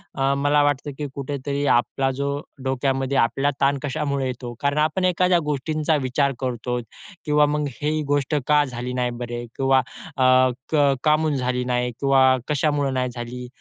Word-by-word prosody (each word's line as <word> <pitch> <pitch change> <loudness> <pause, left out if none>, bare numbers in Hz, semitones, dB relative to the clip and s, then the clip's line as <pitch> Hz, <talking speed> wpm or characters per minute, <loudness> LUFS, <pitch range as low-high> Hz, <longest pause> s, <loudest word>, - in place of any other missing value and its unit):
अ, 135 0 +1
मला 145 +1 +4
वाटतं 145 0 0
की 150 - -3
कुठेतरी 140 +1 -3
आपला 135 +2 +2
जो 140 0 0 0.3
डोक्यामध्ये 135 +1 0
आपला 135 +4 +2
ताण 140 0 +2
कशामुळे 140 -1 -1
येतो? 125 -1 -5
कारण 140 0 0
आपण 155 +5 +1
एखाद्या 180 0 +3
गोष्टींचा 155 +2 0
विचार 140 +2 +1
करतो 125 -1 -3 0.4
किंवा 150 0 +4
मग 150 0 -1 0.2
ही 155 +1 0
गोष्ट 145 +1 0
का 150 0 +5
झाली 125 -1 -5
नाही 125 -1 0
बरे 120 0 -4
किंवा 135 0 +3 0.4
अ, 130 - +2 0.5
क 145 -2 +4
काहून 155 0 +2
झाली 125 -1 -1
नाही 125 0 0
किंवा 135 -1 +4
कशामुळे 145 -1 +1
नाही 130 -1 -1
झाली, 125 +1 -6
140 Hz, 160 wpm, -23 LUFS, 125-150 Hz, 0.5 s, का